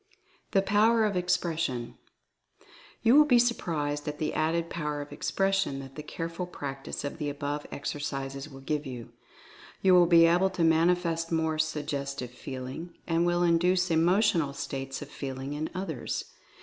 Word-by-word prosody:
THE 195 - +2
POWER 220 +3 +4
OF 205 -2 0
EXPRESSION. 165 -8 -1 1.1
You 235 +3 +6
will 300 +1 +8
be 250 -5 +5
surprised 155 -12 0
at 150 0 -3
the 155 - -2
added 165 +2 0
Power 150 -3 -3
of 145 0 -7
Ex - - -3
pression 195 -7 +1
that 135 -1 -9
the 150 - -7
careful 165 +3 -5
practice 135 -5 -6
of 145 +3 -5
the 150 -2 -1
above 145 +1 -4
exer 145 +1 -4
cises 135 +1 -4
will 135 0 -11
give 150 +1 -2
you. 125 -3 -7 0.7
You 190 -1 +6
will 175 -1 +7
be 165 -1 +7
able 175 +3 +4
to 185 -2 -1
manifest 165 0 +2
more 160 -1 0
Suggestive 145 -4 -2
Feeling, 130 +7 -7
and 170 +1 +1
will 175 0 +2
induce 180 +1 +3
Emotional 170 -2 +3
States 135 0 -5
of - - -10
Feeling 135 0 -5
in 155 +2 -3
others. 190 +1 -4
160 Hz, 160 wpm, -28 LUFS, 145-180 Hz, 1.1 s, will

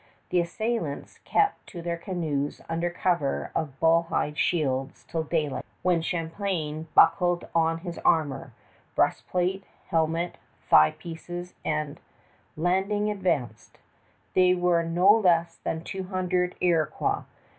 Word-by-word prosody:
The 180 - +2
assailants 175 -2 -3
kept 410 -1 +1
to 170 -2 -8
their 170 0 -1
canoes 155 -6 -2
under 170 +1 -1
cover 170 -5 -1
of 140 -4 -3
bull 165 +1 +4
hide 150 - -1
shields 135 -6 0
till 165 - -2
daylight, 155 -3 -1 0.2
when 180 -2 +3
Champlain 165 -2 -3
buckled 175 +1 +4
on 165 0 +2
his 175 -2 -6
armor 140 -5 +1 0.4
breastplate, 185 +2 0 0.3
helmet, 165 +1 0 0.3
thigh 75 0 +6
pieces 175 +1 -7
and 150 -2 -2 0.6
landing, 195 +5 +1
advanced. 140 - -2 0.6
There 185 0 +4
were 175 -1 +3
not 180 +6 +4
less 170 -3 +2
than 160 0 -4
two 190 +1 -5
hundred 180 -1 -1
Iroquois. 165 -4 +1
170 Hz, 120 wpm, -27 LUFS, 160-180 Hz, 0.6 s, thigh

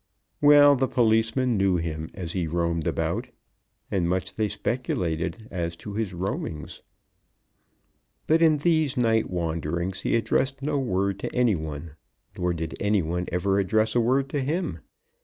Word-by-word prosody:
Well 145 -1 +7
the 130 0 +1
policemen 115 +1 +2
knew 95 -1 +2
him 80 -1 -4
as 85 -4 -5
he 90 -3 -1
roamed 85 -1 -1
about, - - -1 0.6
and 90 -3 +1
much 95 +1 -1
they 110 -1 0
speculated 105 -3 -2
as 85 -2 -3
to 100 +4 -8
his 105 -2 -2
roamings. 90 -4 -4 1.4
But 160 +1 +3
in 160 -2 +5
these 155 -3 +1
night 115 -2 +2
wanderings 85 +2 -2
he - - +1
addressed 135 +4 0
no 145 0 0
word 100 -5 -1
to - - -5
any 125 -3 +3
one; 80 -1 -6 0.4
nor 90 0 0
did 80 -1 -4
any 100 -2 +2
one 90 +3 -2
ever 95 +3 +1
address 110 +3 +1
a 120 - +3
word 130 +4 +2
to 145 0 -1
him. 165 +7 -2
100 Hz, 155 wpm, -25 LUFS, 85-125 Hz, 1.4 s, Well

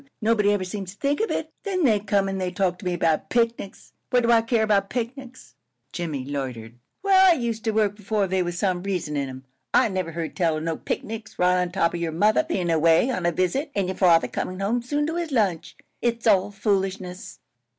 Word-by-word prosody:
Nobody 215 -2 +2
ever 205 -2 0
seems 190 0 -6
to - - -38
think 285 +4 0
of 445 - 0
it. - - -3
Then 375 -4 -1
they 220 -7 +4
come 200 -1 +1
and 185 -2 -3
talk 185 -2 0
to 190 - -11
me 180 -1 0
about 165 -2 0
picnics! 230 -4 -2 0.2
What 245 -1 +3
do 235 - +3
I 230 -1 +6
care 230 -1 +1
about 200 -2 +2
picnics?" 255 +1 -6 0.4
Jimmie 155 -7 -4
loitered. 125 -5 -5 0.2
"Where 380 -1 +6
I 365 - +7
used 235 -6 -3
to 220 - +2
work 210 -2 +1
b'fore, 210 0 0
there 185 0 0
was 175 0 -4
some 185 -2 0
reason 180 -6 -3
in 140 -2 -2
'em. 130 0 -10 0.3
I - - +5
never 185 -4 -3
heard 165 -1 -4
tell 165 -4 +1
of 155 - -5
no 165 0 -1
picnics 220 +4 -5
right 180 0 +3
on 180 -1 -2
top 170 -2 +1
of 175 - -3
your 170 -1 -2
mother 210 - +3
bein' 190 - -2
away 165 +9 +4
on 185 -8 -1
a - - +2
visit 185 - -1
an' 195 -2 0
your 190 - -3
father 170 -3 +4
comin' 185 +1 -4
home 220 +5 0
soon 290 +5 -1
to 325 +2 -2
his 340 -3 -3
lunch. 185 - 0 0.2
It's 235 -1 -1
all 200 -3 +4
foolishness." 195 -3 -2
195 Hz, 225 wpm, -24 LUFS, 175-230 Hz, 0.4 s, I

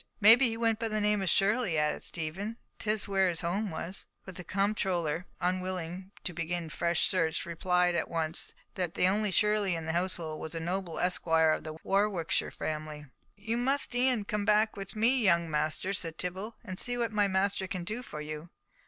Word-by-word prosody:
"Maybe 230 +4 +8
he 225 - -4
went 225 -1 +1
by 230 - -1
the 215 -1 -1
name 210 -1 +2
of 190 - 0
Shirley," 200 -3 +2
added 150 0 +1
Stephen, 185 +7 -4 0.2
"'tis 215 -1 +1
where 195 -2 +3
his 170 -2 -3
home 195 +5 -1
was." 170 +3 -6 0.2
But 190 - -9
the 180 - -7
comptroller, 185 -5 0
unwilling 185 0 -2
to 180 - -3
begin 170 +1 -2
a - - -9
fresh 170 +1 +1
search, 165 -5 +1
replied 180 +1 +1
at 170 - -1
once 160 -1 -1 0.2
that 180 -3 -3
the 180 - +3
only 210 +2 +2
Shirley 205 0 +2
in 165 -1 -4
the 160 - -2
household 170 -3 -2
was 160 +1 -5
a - - -2
noble 175 +1 -3
esquire 165 -3 +3
of - - -1
the 155 0 -7
Warwickshire 195 -4 +1
family. 155 -1 -5 0.3
"You 220 +3 -2
must 270 +2 +1
e'en 245 -3 +2
come 210 0 -1
back 215 +1 +3
with 195 0 -7
me, 240 +4 +3
young 170 -5 +3
masters," 155 +6 0
said 165 -2 -4
Tibble, 190 +5 -4
"and 185 -5 -6
see 245 0 -1
what 235 -2 0
my 205 -1 +2
master 190 0 +1
can 185 -2 -4
do 215 +7 -4
for 150 -11 -7
you." 155 +2 -6
185 Hz, 195 wpm, -30 LUFS, 165-210 Hz, 0.3 s, Maybe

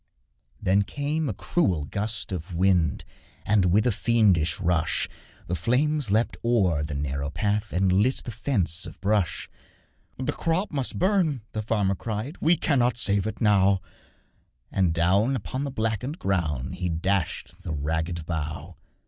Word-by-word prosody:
Then 95 +2 +3
came 145 +7 -2
a - - -1
cruel 90 - 0
gust 105 +4 -3
of 90 0 -5
wind, 85 -6 +2 0.4
And, 105 -3 +3
with 100 +5 +3
a 125 - +3
fiendish 95 -8 +2
rush, 85 -4 +1 0.4
The 90 - -4
flames 130 - +1
leapt 110 +4 +1
o'er 95 -10 +2
the 75 -1 -4
narrow 70 0 -2
path 100 +7 -1
And 95 0 +2
lit 105 +8 +2
the 120 - -5
fence 95 - 0
of - - -11
brush. 100 -5 0 0.7
'The 130 +3 -1
crop 170 +7 -1
must 135 -4 -1
burn!' 180 - +2
the 110 - -3
farmer 105 -3 +1
cried, 110 - -5
'We 165 +2 +4
cannot 125 -6 +2
save 100 -2 +2
it 110 - -5
now,' 100 -3 +4 0.9
And 95 -3 +2
down 95 +10 +2
upon 130 +4 -3
the - - -2
blackened 115 - -2
ground 75 - -1
He 90 -1 -2
dashed 90 +1 -2
the - - -5
ragged 80 +3 -2
bough. 80 -2 -4
100 Hz, 150 wpm, -26 LUFS, 85-120 Hz, 0.9 s, We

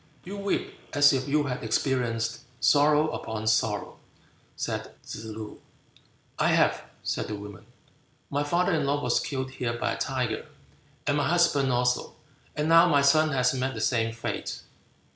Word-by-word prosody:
"You 195 +3 -7
weep 200 0 -3
as 145 -1 +6
if 130 0 -1
you 150 +1 +2
had 125 -3 -4
experienced 115 -4 0 0.2
sorrow 150 +4 +4
upon 110 0 -5
sorrow," 110 -1 0 0.6
said - - -4
Tsze 110 - -7
loo. 110 -1 -8 0.8
"I - - +3
have," - - +3 0.2
said - - -2
the 105 - -4
woman, 100 -2 -10 0.6
"my 145 +1 0
father 175 +5 +1
in 150 -3 +1
law 145 +1 +1
was - - +2
killed 130 -2 -3
here 125 -2 -3
by - - -1
a - - -5
tiger, 125 -5 -2 0.6
and 145 - +1
my 145 0 +1
husband 155 -6 +3
also; 125 0 0 0.4
and 150 +1 -1
now 165 +1 +7
my 140 -1 +4
son 155 +3 +5
has 125 -1 +2
met 130 0 -2
the - - -5
same 115 -2 +1
fate." 115 0 -5
130 Hz, 160 wpm, -27 LUFS, 115-145 Hz, 0.8 s, now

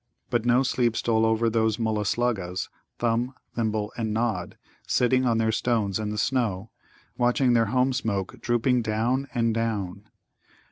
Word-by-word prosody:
But 120 -2 +1
no 125 +2 +4
sleep 120 -3 +1
stole 115 -1 +2
over 110 +1 +2
those 110 -1 +1
Mulla 110 -2 -1
sluggas, 95 -5 -1 0.3
Thumb, 120 +2 0 0.2
Thimble, 110 -2 -1
and 110 -2 -2
Nod, 110 -5 -2 0.3
sitting 130 +1 +2
on 115 -2 +2
their 110 0 +2
stones 110 -4 0
in 105 -1 -2
the 105 - -4
snow, 110 -4 -1 0.5
watching 125 +1 +3
their 115 -2 +3
home 130 +4 +2
smoke 100 -7 -3
drooping 120 +1 +2
down 120 +5 0
and 115 -1 +2
down. 105 -3 -3
115 Hz, 150 wpm, -26 LUFS, 110-120 Hz, 0.5 s, no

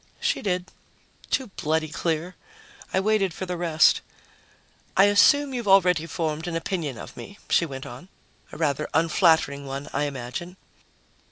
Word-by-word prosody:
She 470 +1 0
did. 180 -2 -2 0.6
Too 255 -6 -1
bloody 155 +1 0
clear. 165 +3 -2 0.6
I 190 - +2
waited 195 -3 +1
for 190 - -4
the 180 -1 -3
rest. 165 -3 +3 1.0
"I 195 - +7
assume 270 +8 +5
you've 240 -4 -4
already 180 -4 +4
formed 160 0 -3
an 170 - -3
opinion 165 - -3
of - - -10
me," 200 - -10
she 170 - +3
went 135 -2 -7
on. 130 +10 -10 0.4
"A - - -9
rather 150 -2 -1
unflattering 160 -3 +3
one, 135 +1 -6
I 145 - 0
imagine." 145 +7 -6
170 Hz, 150 wpm, -25 LUFS, 150-190 Hz, 1.0 s, I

